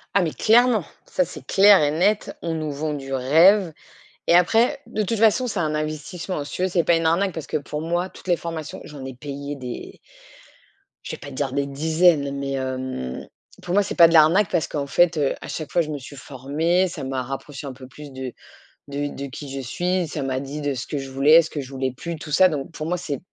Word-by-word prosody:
Ah, 200 - +5
mais 165 -3 0
clairement! 225 - +4 0.2
Ça, 180 - +1
c'est 175 - -10
clair 200 -1 +6
et 145 - +3
net, 190 +8 0
on 165 - -2
nous 155 -2 -3
vend 150 +2 -3
du 135 -2 -6
rêve. 165 +8 +4 0.5
Et - - +4
après, 225 +9 +4
de 215 - -1
toute 225 +3 -2
façon, 225 +4 +4
c'est 210 -6 -2
un 155 -2 0
investissement. 155 +3 -4
Si 145 - -9
tu - - -3
veux 185 - +2
c'est 180 -1 +1
pas 170 +1 +3
une 165 0 0
arnaque 185 +4 +2
parce 160 -3 -6
que - - -2
pour 150 +1 -6
moi, 175 +3 -1
toutes - - -16
les 175 -2 +3
formations 165 -2 -6
j'en 145 -3 -9
ai 130 -1 -7
payé 140 +2 -6
des 125 -3 -8 1.1
je - - -5
vais - - -5
pas - - -10
te - - -10
dire 135 0 -2
des 140 0 0
dizaines, 155 0 +2
mais, 135 0 -3
hem, 130 - -4 0.3
pour 175 - -4
moi, 205 +1 +4
c'est 200 - -5
pas 170 -2 +8
de 165 - -1
l'arnaque 165 +5 +5
parce 160 - +1
qu'en 140 -2 -3
fait, 175 +3 +3
heu, 145 -2 +1
à - - -8
chaque 155 -2 -5
fois 175 - +3
je 155 - -4
me 150 - -3
suis 140 +2 -11
formée, 145 +8 0
ça 170 - -7
m'a 130 -1 -2
rapproché 135 +2 -7
un 135 - -6
peu 130 0 -12
plus 145 +2 -11
de 130 -1 -6 0.6
de 145 +1 -2
de 140 - -5
qui 140 +1 -8
je 135 0 -4
suis, 175 +8 -1
ça 145 - -5
m'a 130 -1 -1
dit 140 +2 -6
de 145 -2 -1
ce 125 - -4
que 145 - -3
je 135 0 -7
voulais, 145 +5 +6
ce 165 - -6
que 150 - -5
je 130 0 -10
voulais 130 -1 -2
plus, 165 +6 -6
tout 150 0 -9
ça. 185 +5 +6
Donc 145 -3 -4
pour 155 -2 -6
moi, 180 +2 0
c'est 145 -6 -4
155 Hz, 245 wpm, -23 LUFS, 140-175 Hz, 1.1 s, pas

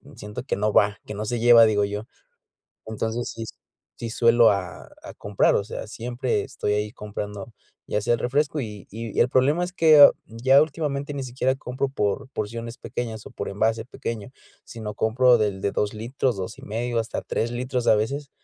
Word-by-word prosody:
siento 105 +2 -7
que - - -2
no 105 0 0
va, 100 -1 +3
que 105 - -7
no 105 +1 -4
se 120 +2 -2
lleva, 120 -1 +7
digo 105 -2 +2
yo, 105 +2 -5 0.8
entonces, 110 +2 -3
sí 115 0 -6 0.5
sí 115 - -5
suelo, 115 0 +5
a 90 -3 -4
a - - -9
comprar, 100 -1 +1
o - - +2
sea, 110 - -6
siempre 120 -1 -2
estoy 105 - -3
ahí 105 0 -1
comprando, 105 0 -7 0.3
ya 105 - -1
sea 120 +3 +1
el - - -2
refresco, 145 +4 0
y 105 -4 -7
y 115 0 -6
el 120 - +4
problema 140 +7 +2
es 180 0 -3
que 155 -5 +8 0.2
ya 130 +5 +4
últimamente 145 -2 -3
ni 135 - -3
siquiera 130 +1 0
compro 135 0 -3
por 105 -1 -2
porciones 115 +1 -5
pequeñas 115 -2 -5
o - - -9
por 100 - -5
envase 110 +3 0
pequeño, 115 -3 -6 0.3
sino 110 -3 -7
compro 120 +3 +4
del 100 -3 -1
de 100 - 0
2 105 +1 -1
litros, 120 +1 -1
2 95 -1 -6
y - - -13
medio, 115 +2 -2
hasta 115 0 -3
3 115 +1 -2
litros 125 0 -2
a - - +6
veces, 140 +7 -2
115 Hz, 190 wpm, -24 LUFS, 105-130 Hz, 0.8 s, que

